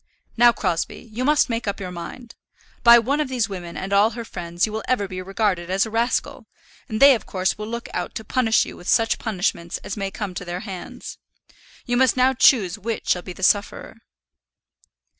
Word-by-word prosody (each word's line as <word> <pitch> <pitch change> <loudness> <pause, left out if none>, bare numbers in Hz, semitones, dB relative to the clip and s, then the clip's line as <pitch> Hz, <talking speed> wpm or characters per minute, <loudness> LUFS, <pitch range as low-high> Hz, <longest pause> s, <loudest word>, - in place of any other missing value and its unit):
"Now, 240 +1 +6
Crosbie, 195 +3 -3
you 245 +4 -3
must 295 +2 +3
make 230 -3 -3
up 200 - -2
your 185 -2 -6
mind. 225 +7 -9 0.5
By 235 0 +9
one 265 +6 0
of 300 - -1
these 250 -4 0
women 180 -4 -7
and 195 +1 -4
all 205 +2 +5
her 235 0 -7
friends 175 -3 -2
you 215 - -7
will 220 +1 -3
ever 205 -6 0
be 185 -1 -6
regarded 190 -2 -1
as 190 +3 +2
a 220 - -8
rascal, 235 +3 -1 0.4
and 215 -1 -3
they 275 +1 +8
of 235 - -4
course 185 -1 -1
will 210 0 -7
look 235 +1 -5
out - - -4
to 220 - -5
punish 225 0 +2
you - - -9
with 175 - -13
such 225 -1 +2
punishment 180 -5 -2
as 195 - -5
may 195 -2 -3
come 195 -1 -5
to 180 - -6
their 175 +1 -5
hands. 190 -5 -8 0.7
You 245 0 0
must 260 0 +3
now 255 +1 +4
choose 215 -7 +4
which 225 +2 -4
shall 180 - +2
be 180 - -8
the 190 - -10
sufferer." 205 +3 0
215 Hz, 210 wpm, -22 LUFS, 185-235 Hz, 0.7 s, By